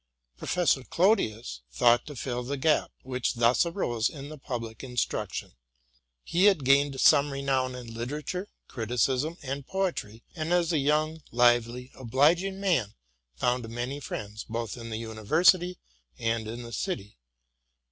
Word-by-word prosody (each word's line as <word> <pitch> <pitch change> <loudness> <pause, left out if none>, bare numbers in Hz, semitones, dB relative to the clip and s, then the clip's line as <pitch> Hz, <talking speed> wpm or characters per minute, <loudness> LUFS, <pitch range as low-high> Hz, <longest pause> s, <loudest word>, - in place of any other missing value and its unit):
Professor 150 - +1
Clodius 120 - +1
thought 120 - +4
to 145 - -7
fill 125 -1 -3
the 140 +3 -3
gap 150 +3 +2
which 130 -1 -2
thus 120 +7 +3
arose 120 - 0
in 145 -1 -9
the 155 - -8
public 115 -4 -5
instruction. 125 -2 -2 0.7
He 180 +4 +2
had 190 -10 +4
gained 140 0 +4
some 145 0 +5
renown 135 -2 0
in 120 -2 -8
litera 125 +6 -4
ture, 180 +7 -4 0.2
criticism, 125 +7 0
and 140 0 -5
poetry, 170 - -2
and, 160 0 -3
as 175 -1 +2
a 155 - +3
young, 155 +3 +1
lively, 120 +1 +2
obliging 160 +10 +2
man, 165 - +1 0.4
found 125 - 0
many 120 +4 -4
friends, 105 -5 -6
both 115 -1 -4
in 115 -1 -8
the 110 - -3
university 160 - +2 0.4
and 115 -1 -1
in 120 +2 -6
the 115 0 -9
city. 105 - -4
130 Hz, 145 wpm, -28 LUFS, 115-155 Hz, 0.7 s, some